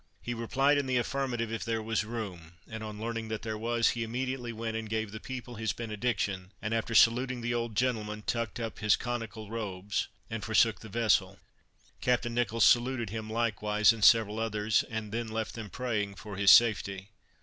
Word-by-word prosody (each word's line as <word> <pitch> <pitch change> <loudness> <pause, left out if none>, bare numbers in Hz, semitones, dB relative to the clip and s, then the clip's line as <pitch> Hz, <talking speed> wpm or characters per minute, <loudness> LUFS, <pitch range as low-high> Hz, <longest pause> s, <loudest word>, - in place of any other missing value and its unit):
He 120 - -3
replied 135 +5 +2
in 140 - -2
the 130 -1 +1
affirmative, 120 -3 -1
if 115 - -3
there 115 -1 -1
was 110 -1 -1
room; 100 -8 -6
and 110 -1 -7
on 105 -1 -7
learning 115 0 -3
that 110 -1 -4
there 110 -1 -3
was, 115 +1 +1
he 120 - -2
immediately 125 +1 -3
went 115 0 -4
and 110 -1 -4
gave 110 -1 -2
the 110 - -7
people 125 0 -7
his 110 - 0
benediction; 105 -4 -2
and 105 +2 -3
after 115 0 -1
saluting 125 +2 +4
the 120 +1 -1
old 115 -2 -2
gentleman, 105 -4 -1
tucked 115 -1 -2
up 115 -1 -5
his 105 -2 +4
conical 115 -3 -5
robes 100 -3 -3 0.2
and 110 0 -5
forsook 110 0 +3
the 110 - -11
vessel. 115 0 +2 0.6
Captain 125 -1 +1
Nicholls 115 -1 +2
saluted 120 -3 +3
him 110 0 -5
likewise, 105 -1 +2
and 110 -2 -5
several 110 -1 +5
others, 110 -1 +1
and 110 -2 -4
then 115 +1 -2
left 110 0 -3
them 110 -3 -7
praying 105 -5 -2
for 100 +1 -8
his 100 0 +4
safety. 100 -4 +5
115 Hz, 190 wpm, -30 LUFS, 105-120 Hz, 0.6 s, several